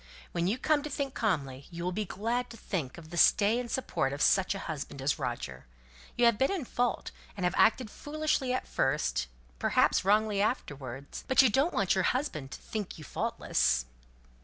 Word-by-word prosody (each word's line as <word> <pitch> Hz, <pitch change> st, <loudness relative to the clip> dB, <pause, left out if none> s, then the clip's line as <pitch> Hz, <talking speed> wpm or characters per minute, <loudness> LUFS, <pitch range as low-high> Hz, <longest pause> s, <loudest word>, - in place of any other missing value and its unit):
When 170 Hz, 0 st, 0 dB
you 215 Hz, +6 st, +1 dB
come 300 Hz, +2 st, +2 dB
to 300 Hz, -, -5 dB
think 275 Hz, -2 st, -3 dB
calmly, 140 Hz, -, -1 dB
you'll 170 Hz, +1 st, -3 dB
be 210 Hz, +3 st, -2 dB
glad 230 Hz, +7 st, -2 dB
to 230 Hz, -, -10 dB
think 165 Hz, -, -4 dB
of 160 Hz, -1 st, -12 dB
the 170 Hz, -, -5 dB
stay 210 Hz, +6 st, +5 dB
and 245 Hz, -1 st, -5 dB
support 220 Hz, -, -1 dB
of 145 Hz, -, -5 dB
such 190 Hz, 0 st, +3 dB
a 195 Hz, -, -6 dB
husband 145 Hz, -3 st, -5 dB
as 135 Hz, +3 st, 0 dB
Roger. 120 Hz, -, -4 dB, 0.5 s
You 240 Hz, -, +3 dB
have 235 Hz, -3 st, +4 dB
been 270 Hz, -, +3 dB
in 365 Hz, -9 st, -2 dB
fault, 245 Hz, 0 st, -1 dB, 0.3 s
and 190 Hz, -, -3 dB
have 180 Hz, -, +2 dB
acted 225 Hz, 0 st, +3 dB
foolishly 300 Hz, -3 st, -1 dB
at 255 Hz, -, -2 dB
first, 135 Hz, -, 0 dB, 0.3 s
perhaps -, -, +3 dB
wrongly 210 Hz, +1 st, +3 dB
afterwards; 140 Hz, -, -3 dB
but 260 Hz, +1 st, +6 dB
you 250 Hz, -, +4 dB
don't 280 Hz, -, +2 dB
want 195 Hz, -3 st, +2 dB
your 190 Hz, -1 st, +1 dB
husband 250 Hz, -, -1 dB
to -, -, -8 dB
think 210 Hz, -3 st, -5 dB
you 155 Hz, -, -10 dB
faultless?" -, -, 0 dB
200 Hz, 190 wpm, -30 LUFS, 150-245 Hz, 0.5 s, but